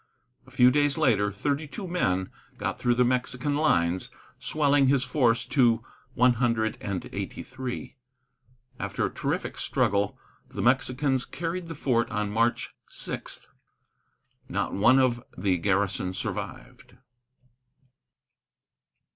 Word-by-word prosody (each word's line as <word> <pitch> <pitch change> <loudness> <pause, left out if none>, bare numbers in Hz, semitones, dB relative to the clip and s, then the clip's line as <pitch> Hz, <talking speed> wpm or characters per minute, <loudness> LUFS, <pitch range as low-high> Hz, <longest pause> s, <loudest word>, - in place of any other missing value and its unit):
A - - -14
few 125 0 +5
days 145 +1 +2
later, 110 -10 +3
thirty 140 +9 -2
two 195 +6 -7
men 95 - 0 0.3
got - - -3
through 120 -1 +2
the 125 0 +4
Mexican 125 +3 0
lines, 90 - +1 0.3
swelling 145 -2 +2
his 135 -1 +3
force 125 -4 +2
to 120 -5 +3 0.3
one 125 +1 +5
hundred 110 -2 +1
and 100 -3 -4
eighty - - -5
three. 130 0 -6 0.8
After 100 +1 -2
a - - -4
terrific - - -3
struggle, 100 0 +1 0.3
the - - -4
Mexicans 130 +1 +2
carried 170 +4 -4
the 165 - -6
fort 120 -5 +1
on 105 -2 -2
March 115 +2 0
6. - - -6 1.0
Not - - -2
one 120 +7 +5
of 125 -2 +2
the 95 -3 +1
garrison 95 -1 0
survived. 95 - -6
125 Hz, 120 wpm, -27 LUFS, 105-140 Hz, 1.0 s, few